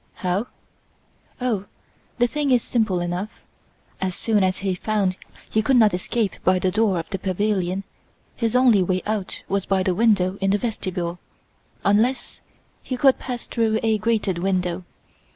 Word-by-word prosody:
"How? 185 +5 -1 0.9
Oh, 230 -6 -1 0.5
the 240 - +4
thing 290 +3 -1
is 250 -3 +4
simple 215 -7 0
enough! 175 +4 -2 0.7
As 185 -2 -1
soon 215 -3 +1
as 185 0 +1
he 190 - +1
found 195 0 0 0.3
he 220 - +1
could 265 +4 +2
not 215 -4 +5
escape 200 +3 -1
by 185 0 +4
the 185 0 0
door 210 -2 +2
of 165 - -4
the 195 - -2
pavilion 190 0 -1 0.5
his 230 -1 -1
only 250 -6 +5
way 185 0 0
out 210 -3 -3
was 195 0 -1
by 190 -1 +2
the 185 - +1
window 195 -2 +2
in 195 - +2
the 200 - +3
vestibule, 185 -6 -3 0.7
unless 235 +6 +1 0.4
he 255 - -4
could 270 0 +4
pass 245 -2 -5
through 220 -2 0
a 220 -1 +2
grated 210 -5 0
window. 180 -1 -1
200 Hz, 160 wpm, -23 LUFS, 185-225 Hz, 0.9 s, not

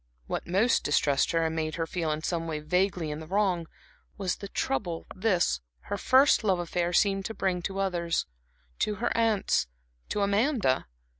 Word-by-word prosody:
What - - -4
most 200 +7 +2
distressed 145 -1 +2
her, 165 -1 +1
and 160 0 -1
made 155 -1 -2
her 165 - -1
feel 165 -1 -2
in 155 +1 -2
some 165 -1 -2
way 155 -2 -2
vaguely 180 0 0
in 150 - -4
the 160 - -9
wrong, 185 -3 +1 0.5
was 190 -3 -1
the 200 - -7
trouble 190 -7 -2
this, 185 - +1 0.2
her - - -4
first 260 +5 +5
love 195 -4 +2
affair, 175 0 -1
seemed 195 +1 +2
to 220 - -4
bring 180 -2 0
to 195 +2 -4
others; 175 -4 0 0.5
to 210 - 0
her 240 +3 -1
aunts, 220 - +2 0.4
to 205 - -1
Amanda. 200 - +2
180 Hz, 175 wpm, -28 LUFS, 165-200 Hz, 0.5 s, first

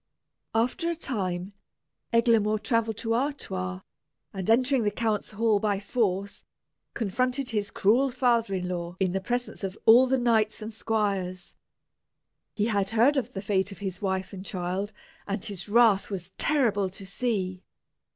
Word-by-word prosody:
After 255 +10 +1
a 340 - -1
time, 195 - -3 0.6
Eglamour 230 -2 +3
travelled 225 0 0
to 225 0 -1
Artois, 95 - -2 0.5
and 190 +1 -4
entering 255 +3 +4
the 210 - +2
count's 215 0 -1
hall 215 0 +2
by 205 -2 0
force, 200 -2 -1 0.5
confronted 250 +5 -1
his 205 -2 -1
cruel 245 +7 +3
father 235 -5 +1
in 180 -1 -2
law 175 0 -4
in 190 -2 +1
the 190 +1 -1
presence 245 +2 -3
of 195 +1 -4
all 240 +4 +8
the 265 +1 +2
knights 225 -3 +2
and 220 0 -6
squires. 195 -5 -2 1.0
He 210 - +1
had 200 -3 +1
heard 235 +7 +4
of 255 -3 -2
the 195 - -5
fate 195 -1 0
of 195 - -9
his 190 -2 -5
wife 190 -1 -2
and 190 -1 -7
child, 190 +2 -3 0.4
and 200 0 -3
his 200 -1 -5
wrath 220 -3 +4
was 190 -2 -4
terrible 220 -10 +1
to 195 +1 -10
see. 190 -3 -2
210 Hz, 155 wpm, -27 LUFS, 190-235 Hz, 1.0 s, all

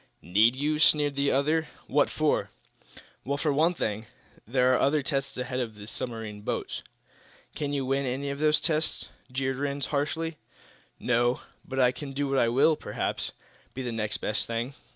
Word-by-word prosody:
"Need 105 +8 +4
you?" 150 +3 0
sneered 145 -2 +4
the 140 0 +2
other. 155 +4 +2 0.2
"What - - +3
for?" - - +1 0.7
"Well, 140 +2 -1
for 145 0 +1
one 165 +5 +3
thing, 110 -5 -2 0.4
there 125 +1 +3
are - - +3
other 145 +1 +3
tests 135 -1 -2
ahead 125 0 -2
of 115 -4 -3
the 105 0 -10
submarine 110 -2 -5
boats." - - -3 0.7
"Can 145 -1 -2
you 140 -2 -1
win 135 +1 +1
any 135 +3 -2
of 140 - -5
those 155 0 +4
tests?" 155 -1 0 0.2
jeered 130 0 -1
Rhinds, 140 -1 -1
harshly. 155 +3 -1 0.6
"No; 120 0 +2 0.2
but 135 0 -4
I 125 -1 +5
can 135 +2 -7
do 140 0 -1
what 130 -4 +3
will, 140 +6 +5
perhaps, - - -3 0.4
be 130 - -3
the 120 - -2
next 110 -2 -1
best 105 - -1
thing. 115 +3 -2
135 Hz, 175 wpm, -28 LUFS, 120-145 Hz, 0.7 s, I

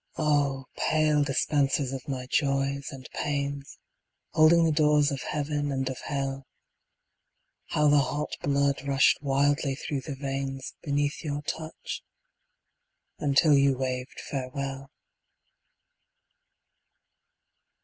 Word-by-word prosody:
Oh, 145 -3 +1
pale 155 -1 +2
dispensers 140 -1 +1
of 130 -2 -6
my 130 -2 -3
Joys 140 +1 0
and 130 -2 -9
Pains, 140 -1 -3 0.6
Holding 165 +2 +6
the 160 - +3
doors 150 -1 +3
of 135 -2 -3
Heaven 145 -1 -2
and 135 -1 -1
of 130 - -7
Hell, 135 -1 -3 1.2
How 150 0 +2
the 145 0 +6
hot 145 +2 -1
blood 140 0 +1
rushed 140 0 +4
wildly 140 0 +1
through 140 0 -4
the 140 0 -6
veins 135 -1 -4
Beneath 145 -1 -1
your 145 -1 -3
touch, 160 +2 -5 1.2
until 145 +2 +4
you 140 -1 +4
waved 130 0 -3
farewell. 135 0 -5
140 Hz, 110 wpm, -27 LUFS, 135-150 Hz, 1.2 s, Holding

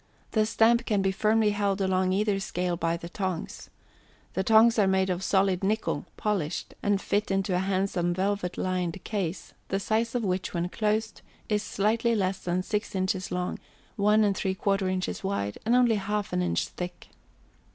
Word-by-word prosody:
The 215 -1 +2
stamp 235 +2 +3
can 205 -4 +1
be 195 - +2
firmly 215 +2 +2
held 205 -1 0
along 185 -1 +1
either 200 +1 +1
scale 180 -2 -2
by 165 0 -1
the 170 - -8
tongs. 185 -1 -4 0.6
The 190 - 0
tongs 225 +2 +5
are 200 - +4
made 190 0 +2
of 180 +1 -2
solid 190 -1 +2
nickel, 215 +3 0
polished, 195 -8 -2
and 205 -1 +2
fit 205 +1 -1
into 195 -1 0
a 180 - +2
handsome 190 -2 0
velvet 190 0 -1
lined 185 -1 -2
case, 190 -6 -3
the 195 - -1
size 225 +4 0
of 240 - 0
which, 185 -2 -2
when 170 +1 -1
closed, 215 +1 -1 0.3
is 210 -1 +1
slightly 225 +3 +1
less 190 -2 0
than 180 +1 -1
6 210 0 -3
inches 185 0 -1
long, 180 0 -2 0.4
1 210 +1 +4
3/4 195 -1 0
inches 185 +1 -3
wide, 145 - -2
and 235 - +4
only 240 -3 +4
1/2 205 - -1
inch 85 -1 0
thick. 180 0 -7
195 Hz, 170 wpm, -27 LUFS, 185-210 Hz, 0.6 s, tongs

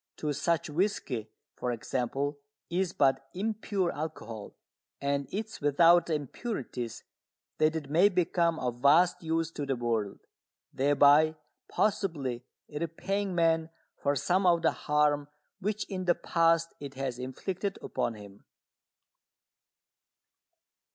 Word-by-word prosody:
To 150 -1 -1
such 165 +3 0
whisky, 150 - -1 0.2
for 125 - -3
example, 135 +4 -2 0.3
is 180 0 0
but 135 -3 +2
"impure" 200 -2 -1
alcohol, 145 -9 -6 0.4
and 140 -1 -1
it 215 +3 -2
is 220 - -12
without 165 +4 +5
the 160 - +1
"impurities" 135 - -5 0.6
that 155 +1 +3
it 155 -3 -3
may 170 +8 +5
become 175 -3 +1
of 125 -3 -3
vast 165 +6 +5
use 165 0 -1
to 150 - -5
the 135 -1 -1
world, 115 -4 -1 0.6
thereby 145 +3 +5 0.3
possibly 145 - -1 0.2
repaying 180 +5 -3
man 165 -1 +2 0.3
for 140 0 +1
some 185 +7 +2
of 170 -1 +4
the - - +4
harm 150 -1 +1 0.3
which 210 +2 -2
in 185 -2 -4
the 175 -1 +4
past 165 0 +2
it 140 -1 -8
has 130 -2 -3
inflicted 185 +10 -4
upon 115 - -2
him. 100 -1 -13
155 Hz, 125 wpm, -30 LUFS, 135-175 Hz, 0.6 s, without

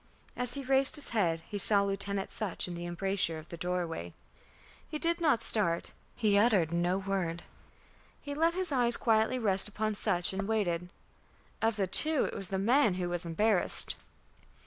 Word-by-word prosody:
As 250 +1 -4
he 280 - -5
raised 270 +2 +4
his 295 - -1
head, 170 -7 0
he 205 - -5
saw 200 0 +5
Lieutenant 200 0 -3
Sutch 205 -5 -2
in 180 - -6
the 175 0 -6
embrasure 175 -1 -1
of 155 +1 -12
the - - -7
doorway. 170 - -4 0.7
He 305 - -4
did 335 +2 -1
not 285 -9 +2
start, 170 -8 0 0.2
he 210 -3 +2
uttered 200 -8 +2
no 175 +2 0
word; 190 -4 -3 0.8
he 285 - -7
let 330 +3 +1
his 370 -3 -2
eyes 240 -3 +4
quietly 225 +2 +1
rest 200 -5 0
upon 215 +1 -3
Sutch 180 -3 +1
and 195 +1 -3
waited. 180 -6 -1 0.7
Of 225 0 +1
the 200 -2 0
two 305 - +3
it - - -5
was 195 - -3
the 190 - -3
man 220 +1 +2
who 180 -1 -3
was 175 0 -4
embarrassed. 200 +4 +3
200 Hz, 175 wpm, -30 LUFS, 175-235 Hz, 0.8 s, saw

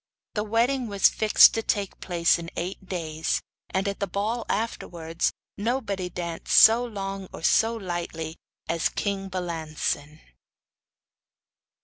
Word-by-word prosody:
The 210 - -1
wedding 235 +4 +1
was 200 -2 +4
fixed 215 -1 +6
to 225 - 0
take 205 -3 -2
place 170 -2 +2
in 165 0 -6
eight 185 +3 -4
days, 160 -3 -1 0.3
and 190 +2 -1
at 200 - -3
the 200 - -1
ball 215 +6 -2
afterwards 170 -6 -2 0.3
nobody 205 -5 -1
danced 170 -2 -5
so 230 +2 +8
long 195 -4 -5
or - - -10
so 225 +7 +3
lightly 175 -5 -4 0.3
as 165 -1 +1
king 195 -1 -3
Balancin. 160 -4 -3
195 Hz, 125 wpm, -26 LUFS, 170-215 Hz, 0.3 s, so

